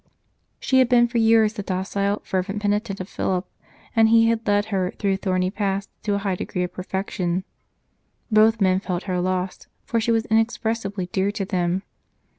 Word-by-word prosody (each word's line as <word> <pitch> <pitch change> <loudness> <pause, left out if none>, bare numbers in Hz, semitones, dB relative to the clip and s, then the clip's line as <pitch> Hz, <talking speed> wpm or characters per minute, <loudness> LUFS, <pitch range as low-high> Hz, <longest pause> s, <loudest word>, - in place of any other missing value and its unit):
She 260 - +2
had 255 -2 +4
been 240 -1 +5
for 235 0 -1
years 225 -1 +4
the 210 - -5
docile, 200 +2 -2
fervent 195 +2 -2
penitent 205 0 -1
of 185 - -5
Philip, 185 -1 -2 0.5
and 225 -1 +5
he 225 0 +5
had 230 -1 -1
led 205 0 +3
her 185 -2 +1
through 195 -1 0
thorny 185 -1 0
paths 200 -1 -2
to 205 -1 0
a - - +1
high 200 -1 -1
degree 180 0 -3
of 180 - -4
perfection. 185 -1 -2 0.9
Both 220 +1 +5
men 190 -2 +3
felt 185 -2 -3
her 180 -2 -1
loss, 185 0 -2 0.2
for 230 - 0
she 230 - +1
was 225 0 +1
inexpressibly 220 -3 0
dear 190 +1 +1
to 200 -2 -2
them. 185 -1 -1
200 Hz, 180 wpm, -23 LUFS, 185-220 Hz, 0.9 s, been